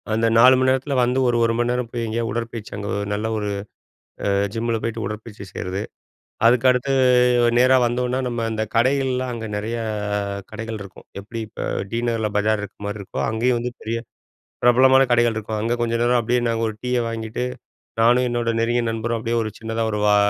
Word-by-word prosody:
அந்த 115 Hz, +1 st, +2 dB
4 125 Hz, +3 st, +8 dB
மணி 130 Hz, 0 st, +2 dB
நேரத்தில 130 Hz, +2 st, 0 dB
வந்து 125 Hz, +2 st, +1 dB
ஒரு, 120 Hz, -, +2 dB
1 115 Hz, -, +1 dB
மணி 120 Hz, 0 st, +1 dB
நேரம் 125 Hz, -1 st, -1 dB
போய் 120 Hz, 0 st, -3 dB
எங்கேயாவது 115 Hz, 0 st, -2 dB
உடற்பயிற்சி 115 Hz, -1 st, -5 dB
அங்க 100 Hz, 0 st, -5 dB, 0.2 s
நல்ல 105 Hz, +2 st, -2 dB
ஒரு, 105 Hz, -1 st, -2 dB, 0.8 s
அ -, -, +2 dB, 0.2 s
ஜிம்மில்ல 115 Hz, 0 st, -1 dB
போய்ட்டு 115 Hz, -1 st, -3 dB
உடற்பயிற்சி 105 Hz, -1 st, -7 dB
செய்றது. 95 Hz, +3 st, -4 dB, 0.6 s
அதுக்க 120 Hz, +2 st, +4 dB
அடுத்து 125 Hz, +2 st, -1 dB, 0.7 s
நேரா 130 Hz, +1 st, +5 dB
வந்தோனா 125 Hz, +1 st, 0 dB
நம்ம 120 Hz, -1 st, -2 dB
அந்த 110 Hz, -1 st, -1 dB
கடைகள்லாம் 130 Hz, +1 st, +1 dB
அங்க 115 Hz, -1 st, -5 dB
நெறைய 110 Hz, +3 st, -3 dB, 0.7 s
கடைகள் 115 Hz, 0 st, -5 dB
இருக்கும். 100 Hz, -2 st, -12 dB
எப்படி 110 Hz, +4 st, -7 dB
இப்ப -, -, -7 dB, 0.3 s
டி 115 Hz, -, 0 dB
நகர்ல 115 Hz, -2 st, 0 dB
பஜார் 105 Hz, 0 st, +1 dB
இருக்கிற 105 Hz, 0 st, -9 dB
மாதிரி 105 Hz, +1 st, -4 dB
இருக்கோ, 95 Hz, -, -6 dB
அங்கேயும் 120 Hz, +3 st, +1 dB
வந்து 125 Hz, +1 st, -3 dB
பெரிய 115 Hz, +1 st, -2 dB, 0.7 s
பிரபலமான 130 Hz, +2 st, +6 dB
கடைகள் 120 Hz, -2 st, +3 dB
இருக்கும். 110 Hz, 0 st, -3 dB
அங்க 115 Hz, +2 st, -1 dB
கொஞ்சம் 115 Hz, 0 st, 0 dB
நேரம் 120 Hz, 0 st, +3 dB
அப்படியே 120 Hz, +2 st, +1 dB
நாங்க 115 Hz, 0 st, -1 dB
ஒரு 110 Hz, -, -6 dB
டீயை 125 Hz, -1 st, 0 dB
வாங்கிகிட்டு 115 Hz, +1 st, -4 dB, 0.6 s
நானும் 120 Hz, +2 st, +4 dB
என்னோட 120 Hz, -1 st, 0 dB
நெருங்கிய 120 Hz, +1 st, +1 dB
நண்பரும் 115 Hz, +1 st, -2 dB
அப்படியே 115 Hz, +1 st, -2 dB
ஒரு 110 Hz, -, -2 dB
சின்னதா 115 Hz, 0 st, -3 dB
ஒரு 105 Hz, -, -2 dB
வா 105 Hz, 0 st, +5 dB
115 Hz, 185 wpm, -22 LUFS, 110-120 Hz, 0.8 s, 4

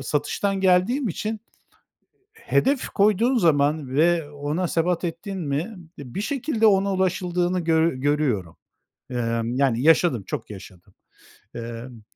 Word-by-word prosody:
satıştan 155 Hz, +8 st, -1 dB
geldiğim 195 Hz, +8 st, +2 dB
için 215 Hz, +5 st, -4 dB, 0.9 s
hedef 285 Hz, -, 0 dB
koyduğun 215 Hz, +5 st, +2 dB
zaman 150 Hz, -, +2 dB
ve 165 Hz, -1 st, +2 dB
ona 150 Hz, +5 st, -2 dB
sebat 170 Hz, +2 st, 0 dB
ettin 175 Hz, +4 st, -4 dB
mi 160 Hz, +7 st, -3 dB, 0.2 s
bir 140 Hz, +6 st, -6 dB
şekilde 235 Hz, -2 st, 0 dB
ona 200 Hz, -1 st, +3 dB
ulaşıldığını 180 Hz, -1 st, 0 dB
gö 165 Hz, -1 st, +2 dB
görüyorum. 130 Hz, -, -1 dB, 0.5 s
Emm, 115 Hz, -1 st, -2 dB
yani, 130 Hz, -3 st, +1 dB
yaşadım, 160 Hz, -, +4 dB
çok -, -, -5 dB
yaşadım. 95 Hz, -1 st, -12 dB, 0.6 s
Emm 115 Hz, 0 st, -7 dB
165 Hz, 115 wpm, -23 LUFS, 135-195 Hz, 0.9 s, yaşadım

